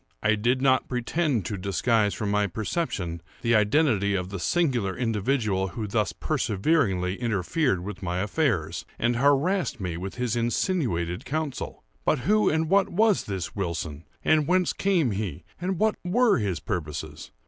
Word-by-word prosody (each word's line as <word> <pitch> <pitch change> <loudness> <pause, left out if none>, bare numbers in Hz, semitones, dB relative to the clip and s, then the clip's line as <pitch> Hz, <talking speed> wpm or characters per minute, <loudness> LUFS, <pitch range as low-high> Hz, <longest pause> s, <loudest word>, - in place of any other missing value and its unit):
I 110 - +4
did 120 +5 +1
not 130 -1 +3
pretend 125 - 0
to 100 0 -3
disguise 105 +3 +1
from 105 -2 -2
my 105 0 +2
perception 100 - -3 0.2
the 115 0 +2
identity 105 -2 +3
of 90 -1 -2
the 100 -1 -5
singular 120 - 0
individual 110 -4 0
who 105 +5 -5
thus 105 -2 0
perseveringly 100 - 0
interfered 110 - 0
with 105 +2 -7
my 90 -1 -2
affairs, 95 - 0
and 120 0 +1
harassed 145 +4 +2
me 90 -4 -3
with 95 +3 -6
his 125 -2 -1
insinuated 115 - 0
counsel. 155 -2 -4 0.2
But 145 - +1
who 210 - +3
and 160 +1 +1
what 195 +2 +3
was 215 +2 +2
this 95 -3 -4
Wilson?—and 85 - -1
whence 180 0 +2
came 180 - +1
he?—and 110 - -4
what 215 +3 +3
were 215 - +3
his 100 -5 -1
purposes? 75 -3 -5
110 Hz, 150 wpm, -26 LUFS, 95-155 Hz, 0.2 s, I